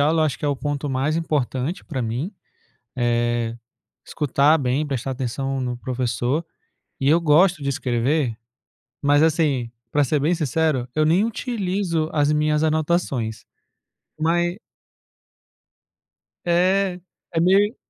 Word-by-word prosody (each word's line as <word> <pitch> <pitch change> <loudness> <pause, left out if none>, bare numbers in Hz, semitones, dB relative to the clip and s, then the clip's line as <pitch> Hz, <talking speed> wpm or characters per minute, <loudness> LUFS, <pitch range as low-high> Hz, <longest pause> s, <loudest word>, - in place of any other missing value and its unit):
aula, 155 +3 +3
eu - - +4
acho 145 - -2
que - - -6
é - - +2
o 140 - 0
ponto 145 +1 -3
mais 135 +4 0
importante 150 -1 -2
para 135 -6 -3
mim, 125 - -3 0.7
eh, 120 -1 0 0.5
escutar 150 +1 +2
bem, 140 +1 0
prestar 135 -2 -3
atenção 135 +1 -3
no 125 -1 -3
professor. 125 +4 -1 0.6
E 135 - +2
eu 160 +3 +5
gosto 170 +1 +4
de 140 - -2
escrever, 125 0 0 0.7
mas 145 +1 +4
assim, 150 -7 +1 0.2
para 145 -1 +3
ser 145 +3 +1
bem 160 +5 +2
sincero, 155 -4 0
eu 155 0 +3
nem 175 +6 +4
utilizo 195 - -1
as 145 -1 +2
minhas 150 0 +2
anotações. 155 -8 0 0.8
Mai 175 +3 +1 1.9
É, 180 +2 +2 0.3
é 165 - +1
meio 200 +6 +4
150 Hz, 130 wpm, -22 LUFS, 130-165 Hz, 1.9 s, eu